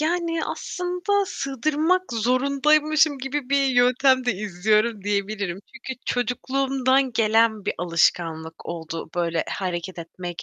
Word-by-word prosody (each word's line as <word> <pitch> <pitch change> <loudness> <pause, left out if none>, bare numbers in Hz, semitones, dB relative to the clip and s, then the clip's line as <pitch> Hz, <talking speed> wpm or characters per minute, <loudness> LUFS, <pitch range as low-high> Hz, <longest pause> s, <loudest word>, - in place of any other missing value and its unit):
Yani 330 0 0
aslında 360 +3 -1
sığdırmak 310 +6 0
zorundaymışım 280 +5 +2
gibi 270 0 -4
bir 280 0 +3
yöntem 255 +1 +3
de 245 - +2
izliyorum 210 +3 0
diyebilirim. 200 -2 -2
Çünkü 260 0 -7
çocukluğumdan 260 +2 +1
gelen 220 -1 +2
bir - - -1
alışkanlık 165 -1 0
oldu 165 -1 -6
böyle 170 -2 0
hareket 180 -1 -4
etmek, 175 +1 -7
245 Hz, 110 wpm, -24 LUFS, 190-280 Hz, -, bir